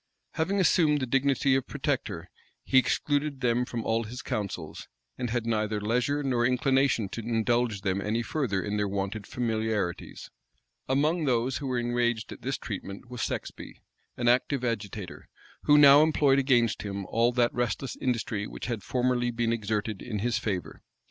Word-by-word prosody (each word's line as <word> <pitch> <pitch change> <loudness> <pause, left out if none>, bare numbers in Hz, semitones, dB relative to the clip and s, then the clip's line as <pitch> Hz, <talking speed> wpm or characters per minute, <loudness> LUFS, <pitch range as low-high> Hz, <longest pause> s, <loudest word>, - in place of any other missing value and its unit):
Having 190 +5 0
assumed 150 -3 +4
the 130 - -1
dignity 135 +1 +2
of 130 -1 +1
protector, - - -3 0.4
he 130 - +5
excluded 145 +1 0
them 125 0 +2
from 120 -2 -5
all 115 +1 +1
his 120 +3 -7
councils, 105 -6 -4 0.3
and 125 - -3
had 120 0 -1
neither 110 -2 0
leisure 125 +7 0
nor 125 -3 +1
inclination 130 -3 +2
to 115 - -5
indulge 115 -1 0
them 95 0 -1
any 110 +3 -1
further 115 - -1
in 105 0 -2
their 105 0 0
wonted 100 +1 -3
familiarities. 110 -6 -2 0.6
Among 155 +5 +2
those 125 0 +1
who 140 - -5
were 130 -1 -1
enraged 120 -2 0
at - - -9
this - - -2
treatment 100 +6 -7
was 125 -1 -5
Sexby, - - -5 0.4
an 120 - -1
active 125 +2 +2
agitator, 105 -4 -4 0.4
who 150 - +6
now 145 0 +9
employed 145 -3 +3
against 120 -4 +2
him 100 -1 -4
all 115 +5 +2
that 120 -1 +2
restless 120 +2 -2
industry 115 -4 -2
which - - -7
had 115 -4 -3
formerly 125 +2 0
been 115 -1 0
exerted 105 -1 -2
in 110 - -4
his 115 +2 0
favor. 100 -5 -4
120 Hz, 165 wpm, -28 LUFS, 110-130 Hz, 0.6 s, now